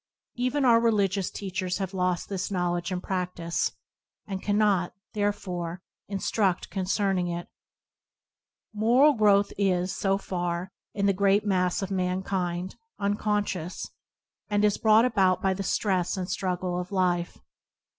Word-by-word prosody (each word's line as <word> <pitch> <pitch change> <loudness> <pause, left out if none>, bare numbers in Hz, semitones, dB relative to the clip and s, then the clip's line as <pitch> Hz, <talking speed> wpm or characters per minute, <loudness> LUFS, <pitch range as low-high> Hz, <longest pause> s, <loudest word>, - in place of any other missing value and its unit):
Even 255 +3 0
our 230 -2 +6
religious 200 -5 +1
teachers 185 -2 -3
have 195 -1 -4
lost 180 -2 0
this 190 -2 -3
knowledge 175 -2 -1
and 180 0 -3
practice, 180 -3 -2 0.5
and 190 -2 -5
cannot, 205 -4 +1 0.2
therefore, 185 -4 -2 0.2
instruct 195 -1 0
concerning 190 -1 0
it. 175 0 -4 1.3
Moral 245 +8 +5
growth 205 -3 +3
is, 185 -2 +1
so 195 0 +1
far, 175 -1 -3 0.2
in 200 -1 0
the 200 - +4
great 200 +2 +3
mass 180 -1 +1
of 195 - -4
mankind, 185 -1 -2 0.2
unconscious, 205 -3 -2 0.6
and 205 0 +2
is 210 - +2
brought 220 +1 +5
about 190 -7 +3
by 190 -1 +1
the 195 - -4
stress 190 -1 0
and 185 -1 -3
struggle 180 -1 -2
of 180 +1 -6
life. 180 -2 0
190 Hz, 130 wpm, -27 LUFS, 180-205 Hz, 1.3 s, our